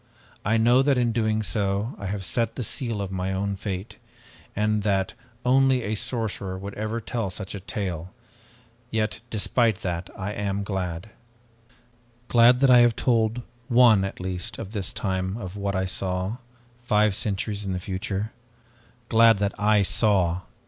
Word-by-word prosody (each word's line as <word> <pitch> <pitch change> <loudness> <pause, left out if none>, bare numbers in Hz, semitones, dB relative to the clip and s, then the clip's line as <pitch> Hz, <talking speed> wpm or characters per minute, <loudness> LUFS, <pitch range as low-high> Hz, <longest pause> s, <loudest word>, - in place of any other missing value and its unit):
I 110 +2 +2
know 120 +3 +5
that 135 -1 +3
in 120 -1 +2
doing 110 -1 0
so 100 +2 -1
I 100 - -4
have 95 0 -3
set 115 +1 0
the 125 - -3
seal 115 -4 -2
of 95 - -6
my 95 0 -2
own 100 +1 -1
fate, 95 0 -5 0.6
and 105 0 +1
that 100 -2 0 0.3
only 130 0 +4
a 105 - -2
sorcerer 110 -5 -2
would 100 +1 -7
ever 110 +2 -3
tell 115 -2 -3
such 95 +1 -6
a 100 - -5
tale, 95 -3 -4 0.8
yet 110 -3 -1
despite 110 -1 +1
that 85 -1 -3
I 100 +1 -3
am 100 -1 -2
glad. 95 0 -4 1.2
Glad 120 +2 +6
that 135 -2 +6
I 125 - +8
have 120 -2 +5
told 115 -1 +1 0.2
one 120 -5 +6
at 95 - -4
least 90 -1 -4
of 105 -3 -7
this 100 -5 -3
time 95 0 -2
of 95 -4 -7
what 100 -1 -2
I 95 0 0
saw 95 +3 -2 0.4
five 105 -3 +3
centuries 105 +1 -2
in 95 -2 -2
the 90 - -2
future. 95 +3 -3 0.8
Glad 115 -2 +6
that 100 0 0
I 105 0 +4
saw! 95 -4 +2
105 Hz, 165 wpm, -25 LUFS, 95-115 Hz, 1.2 s, I